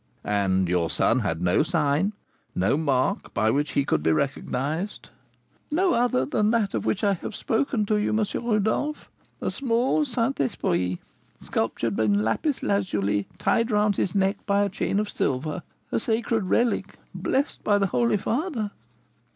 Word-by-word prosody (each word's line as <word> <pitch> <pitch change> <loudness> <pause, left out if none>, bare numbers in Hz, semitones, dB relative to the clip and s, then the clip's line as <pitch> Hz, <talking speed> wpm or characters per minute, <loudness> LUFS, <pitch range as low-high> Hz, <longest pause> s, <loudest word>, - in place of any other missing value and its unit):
"And 95 -3 +1
your 85 -1 +1
son 125 - +2
had 90 -8 -2
no 90 0 +3
sign, 155 +4 +1 0.4
no 95 +8 +2
mark, 140 -4 0
by 110 - +3
which 145 +3 0
he 140 - +2
could - - +1
be 80 - +2
recognised?" 140 - -2 0.6
"No 360 +5 +2
other 235 - +2
than 210 +10 +1
that 220 -4 +1
of - - -2
which 205 - 0
I 200 -1 +4
have 195 +3 -6
spoken 225 -1 0
to 210 +1 +1
you, 210 - 0
M. 215 0 +2 0.2
Rodolph, 225 +7 0 0.3
a - - -1
small 255 +3 +1
Saint 255 -1 -1
Esprit, 90 -9 0 0.4
sculptured 115 -1 -2
in 105 -1 +2
lapis 255 - 0
lazuli, 105 - 0
tied 230 +1 +1
round 210 -2 +2
his 190 - -1
neck 195 0 +1
by 200 0 +3
a 200 - 0
chain 195 +1 -1
of 210 - -1
silver: 150 +1 -2 0.3
a - - +1
sacred 225 -2 0
relic, 210 -1 0 0.2
blessed 260 - -1
by 205 -1 +3
the 200 - +2
holy 225 +3 +2
father." 235 - -2
195 Hz, 160 wpm, -25 LUFS, -, 0.6 s, I